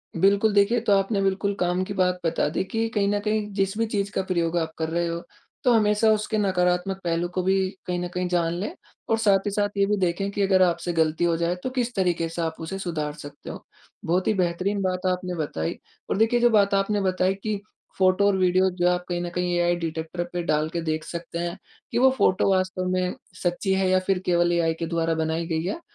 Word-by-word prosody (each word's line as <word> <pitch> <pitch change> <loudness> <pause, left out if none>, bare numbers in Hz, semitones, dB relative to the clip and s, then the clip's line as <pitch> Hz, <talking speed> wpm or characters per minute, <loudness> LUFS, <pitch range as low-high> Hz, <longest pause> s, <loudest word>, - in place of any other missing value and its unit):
बिल्कुल, 200 +4 +3
देखिए 200 +4 +4
ये 230 - 0
तो 205 - +3
आपने 195 +1 0
बिल्कुल 195 +1 0
काम 180 +1 +1
की 200 - -5
बात 180 -1 +1
बता 165 - +1
दी 175 - -1
कि 225 +4 -1
कहीं 205 -3 0
न 205 0 +1
कहीं 210 0 -1
जिस 195 +1 -1
भी 230 - +1
चीज़ 200 -2 -2
का 190 - -1
प्रयोग 175 -2 0
आप 160 -1 -1
कर 160 -1 -2
रहे 170 +1 0
हो, 170 0 -3 0.4
तो 250 - +4
हमेशा 215 0 +3
उसके 215 +1 -1
नकारात्मक 185 -1 +1
पहलू 170 0 0
को 185 - +1
भी 190 0 +2 0.2
कहीं 180 -1 -2
न 180 - -2
कहीं 180 0 -1
जान 170 -2 +1
लें 300 - -3 0.4
और 225 - +3
साथ 205 -3 +4
ही 205 - -1
साथ 205 0 0
ये 200 - +4
भी 210 0 0
देखें 185 +2 0
कि 205 - -2
अगर 190 -1 +3
आपसे 175 -1 +1
गलती 160 0 +1
हो 170 -1 +3
जाए 170 +1 0
तो 255 - -1
किस 245 -2 -2
तरीके 175 -3 0
से 165 +1 -4
आप 160 -1 -2
उसे 175 +4 -4
सुधार 155 -5 -3
सकते 145 -2 -10
हो। - - -8 0.4
बहुत 180 +3 +1
ही 215 - +3
बेहतरीन 185 +2 0
बात 185 0 -1
आपने 180 0 -3
बताई 115 - -3 0.3
और - - 0
देखिए 225 +3 +3
जो 240 0 +5
बात 200 -2 +3
आपने 200 +1 +1
बताई 185 0 +1
कि 215 -2 -1 0.4
फोटो 185 +1 +3
और 200 - +3
वीडियो 185 +1 +3
जो 180 -1 0
है 180 - +4
आप 180 0 -3
कहीं 175 0 -1
न 175 - -3
कहीं 180 0 0
एआई 175 0 +2
डिटेक्टर 165 +1 -4
पे 175 - -1
डाल 155 -1 +1
के 170 0 -3
देख 155 -1 -2
सकते 170 0 -6
हैं 175 +1 -3 0.3
कि - - -1
वो 265 +2 +6
फोटो 185 -2 +3
वास्तव 185 -1 0
में 185 0 0 0.3
सच्ची 180 +2 0
है 190 -1 +1
या 185 0 +4
फिर 190 -2 +2
केवल 175 -1 +3
एआई 165 -1 +2
के 165 - -1
द्वारा 165 -1 0
बनाई 160 +1 -1
गई 160 -2 -1
है। 195 - -3
185 Hz, 240 wpm, -25 LUFS, 170-200 Hz, 0.4 s, वो